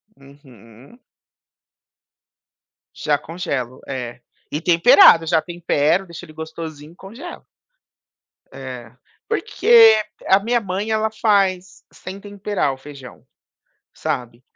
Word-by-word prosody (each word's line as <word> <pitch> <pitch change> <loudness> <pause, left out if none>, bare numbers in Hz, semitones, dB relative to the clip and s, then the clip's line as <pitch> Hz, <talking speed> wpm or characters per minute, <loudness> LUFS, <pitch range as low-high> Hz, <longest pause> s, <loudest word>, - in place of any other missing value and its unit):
Uhum. 135 - -18 2.0
Já 150 -2 0
congelo, 140 -8 -5
é, 125 -3 -6 0.3
e 150 - -2
temperado, 170 -1 +6
já 160 -1 +2
tempero, 175 0 0
deixo 170 0 -10
ele 155 - -15
gostosinho 160 -1 -8
e - - -19
congelo. 200 +8 -11 1.1
É, 125 -4 -9 0.4
porque 225 - +5 0.3
a 190 - +5
minha 235 +4 0
mãe, 195 +2 -4
ela 220 0 0
faz 195 -4 0
sem 190 +2 -10
temperar 200 -7 -3
o - - -11
feijão, 135 -2 -13 0.7
sabe, 120 0 -5
165 Hz, 105 wpm, -20 LUFS, 135-200 Hz, 2.0 s, temperado